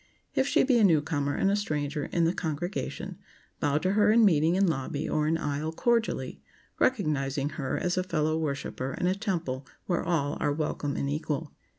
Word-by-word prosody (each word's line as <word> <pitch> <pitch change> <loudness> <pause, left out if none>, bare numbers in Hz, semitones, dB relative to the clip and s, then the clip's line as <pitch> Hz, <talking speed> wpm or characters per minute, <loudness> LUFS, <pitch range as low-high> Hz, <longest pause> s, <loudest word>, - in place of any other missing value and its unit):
If 265 - +2
she - - +4
be 255 -3 +4
a - - +4
newcomer 150 -5 +2
and 195 - +2
a - - +3
stranger 150 -7 -2
in 170 - 0
the 165 - +2
congregation, 175 +2 -4 0.4
bow 145 0 +1
to 185 +5 +1
her 210 +1 +4
in 225 0 +6
meeting 165 -2 +4
in 195 +1 +4
lobby 145 -2 -2
or 155 0 +1
in 165 +1 +2
aisle 150 0 -2
cordially, 230 +6 0 0.4
recognizing 145 - +1
her 140 -2 -3
as 180 0 -1
a 185 - +2
fellow 155 -3 0
worshiper 140 -3 -3
in - - 0
a 180 - +3
temple 170 - -3 0.2
where 175 -2 0
all 155 -4 0
are 145 -1 +1
welcome 145 -1 -2
and 140 - -1
equal. 150 +1 -2
160 Hz, 190 wpm, -28 LUFS, 145-185 Hz, 0.4 s, in